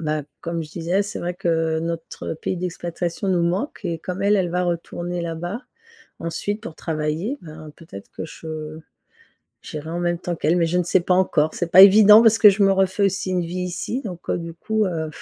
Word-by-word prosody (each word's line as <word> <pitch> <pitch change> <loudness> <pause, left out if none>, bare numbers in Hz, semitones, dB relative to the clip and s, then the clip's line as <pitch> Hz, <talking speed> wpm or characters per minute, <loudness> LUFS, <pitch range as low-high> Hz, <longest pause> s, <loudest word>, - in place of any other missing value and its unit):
bah, 155 -2 -2 0.2
comme 170 0 -3
je 150 - -14
disais, 175 +4 0
c'est 205 +2 -6
vrai 175 0 -3
que 165 -3 0
notre 165 -1 -5
pays 180 +3 -4
d'expatriation 175 +1 -4
nous 175 -2 +2
manque 185 - -2
et 170 -2 -2
comme 185 +3 -5
elle, 205 +1 +3
elle 180 -2 +1
va 180 +1 0
retourner 175 0 -3
là-bas 175 +7 -4 0.6
ensuite 205 +6 -3
pour 160 - -8
travailler, 160 - -2
bah 155 -1 -10
peut-être 100 - -12
que - - -6
je 155 -1 -8 0.8
j'irai 155 +1 -7
en 170 - -3
même 175 -1 0
temps 175 -1 -4
qu'elle. 160 +3 +1
Mais 165 - +2
je 175 +2 -1
ne - - +2
sais 180 +2 +2
pas 180 +1 +1
encore. 160 -4 +2
C'est 175 -1 -3
pas 185 - +9
évident 210 +2 +9
parce 225 -1 +5
que 210 - +9
je 200 +1 0
me 195 - +4
refais 195 +1 +1
aussi 195 -1 -1
une 180 - +1
vie 175 +2 -4
ici 180 +9 -4
donc, 180 -4 -8
heu, - - +1
du 170 -1 -7
coup, 220 +4 -1
heu, 160 -3 -3
175 Hz, 215 wpm, -22 LUFS, 165-190 Hz, 0.8 s, pas